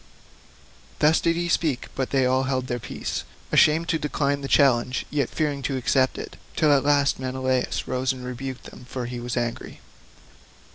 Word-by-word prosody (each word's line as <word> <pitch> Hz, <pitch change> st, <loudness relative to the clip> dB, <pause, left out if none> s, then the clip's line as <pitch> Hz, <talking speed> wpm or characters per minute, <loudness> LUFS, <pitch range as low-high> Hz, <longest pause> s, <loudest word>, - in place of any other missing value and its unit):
Thus 155 Hz, +2 st, +4 dB
did 165 Hz, 0 st, +2 dB
he 175 Hz, +1 st, -1 dB
speak, 155 Hz, -6 st, 0 dB
but 130 Hz, -1 st, -2 dB
they 135 Hz, -2 st, +2 dB
all 130 Hz, +1 st, +2 dB
held 130 Hz, -1 st, -1 dB
their 120 Hz, -1 st, -3 dB
peace, -, -, -4 dB, 0.3 s
ashamed 160 Hz, +2 st, +4 dB
to 160 Hz, -, +1 dB
decline 145 Hz, -1 st, -1 dB
the 135 Hz, -, -4 dB
challenge, 130 Hz, -3 st, +3 dB
yet 140 Hz, -4 st, 0 dB
fearing 145 Hz, -3 st, -1 dB
to 135 Hz, -, -1 dB
accept 130 Hz, 0 st, +2 dB
it, -, -, -7 dB, 0.2 s
till 150 Hz, -2 st, +4 dB
at 140 Hz, -, +3 dB
last 145 Hz, -1 st, +3 dB
Menelaus 130 Hz, 0 st, -1 dB
rose 130 Hz, +1 st, 0 dB
and 130 Hz, -1 st, -7 dB
rebuked 125 Hz, +1 st, -6 dB
them, 125 Hz, -, -12 dB
for 125 Hz, 0 st, -5 dB
he 120 Hz, 0 st, -5 dB
was 120 Hz, +1 st, -4 dB
angry. 120 Hz, -1 st, -3 dB
130 Hz, 180 wpm, -24 LUFS, 125-145 Hz, 0.3 s, Thus